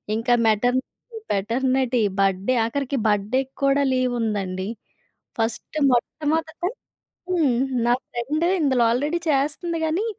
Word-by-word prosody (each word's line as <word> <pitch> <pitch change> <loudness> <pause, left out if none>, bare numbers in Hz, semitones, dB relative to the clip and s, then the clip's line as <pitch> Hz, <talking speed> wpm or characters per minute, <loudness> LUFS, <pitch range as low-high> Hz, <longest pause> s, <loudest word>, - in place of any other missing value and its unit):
ఇంక 225 +3 -4 0.2
maternity, 250 - -1
paternity, 250 +4 +1 0.2
birthday 195 +5 +2
ఆఖరికి 275 +3 -2
బర్త్‌డేకి 215 +6 0
కూడా 275 +1 +3
లీవ్ 255 -1 +1
ఉందండి. 195 -4 -2 0.7
ఫస్ట్ 225 +6 -3 0.2
మొట్టమొదట 315 +7 -1 0.6
హ్మ్, 310 -9 +2 0.3
నా 240 - +4 0.2
ఫ్రెండ్ 285 +7 -2 0.2
ఇందులో 260 -5 +3
ఆల్‌రెడీ 295 +8 0
చేస్తంది 300 +4 0
గానీ, 330 +7 0
255 Hz, 105 wpm, -23 LUFS, 225-295 Hz, 0.7 s, నా